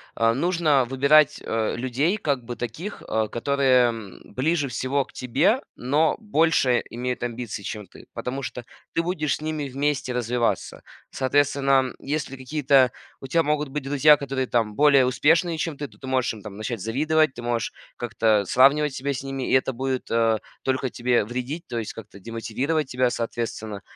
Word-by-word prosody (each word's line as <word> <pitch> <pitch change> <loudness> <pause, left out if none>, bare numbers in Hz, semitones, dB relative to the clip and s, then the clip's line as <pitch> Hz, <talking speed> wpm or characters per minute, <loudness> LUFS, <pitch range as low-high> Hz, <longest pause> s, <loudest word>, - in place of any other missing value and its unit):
э, 115 0 +3
нужно 155 -2 +2
выбирать, 140 +4 +4
э, 110 -1 -1
людей 130 - 0
как 140 - -1
бы 120 +1 -6
таких, 150 - -6
э, 110 -1 0
которые, 130 -1 +3
м, 110 -5 -8
ближе 145 +4 +1
всего 130 +3 -1
к - - -22
тебе, 170 - +1
но 145 +6 +1
больше 160 - +2
имеют 125 +1 -3
амбиций, 120 -3 -4
чем 105 +1 -5
ты, - - -16
потому 135 +2 -4
что 125 -2 -6 0.3
ты 165 - +2
будешь 155 -5 -1
с - - -11
ними 155 -2 -3
вместе 140 -1 -1
развиваться. 120 -1 -1 0.3
Соответственно, 140 +1 +1 0.2
м, - - -14
если 140 -1 -3
какие-то 130 -1 +3 0.3
у 135 - -7
тя 165 +4 +2
могут 150 -1 0
быть 150 +1 -4
друзья, 145 +2 +5
которые, 135 -2 -3
там, 115 -4 0
более 140 -2 +5
успешные, 160 +6 +2
чем 160 -2 -2
ты, 145 - -4
то - - -22
ты 130 - -9
можешь 130 -2 +1
им, 110 - -11
там, 100 -1 -9
начать 110 -1 -4
завидовать, 150 +6 +1
ты 120 - -8
можешь 120 -1 -1 0.3
как-то 110 -3 +1
сравнивать 140 +6 +4
себя 140 +2 -2
с 130 - -4
ними, 135 -1 -4
и - - +2
это 130 0 +3
будет, 130 +1 -3
э, 115 -1 +2 0.2
только 130 0 0
тебе 120 -2 +1
вредить, 125 +9 -5
то 120 - -4
есть 110 -2 -3
как-то 100 -2 -11
демотивировать 130 - -2
тебя, 125 -1 +1
соответственно. 115 -3 -4
130 Hz, 180 wpm, -24 LUFS, 120-145 Hz, 0.3 s, друзья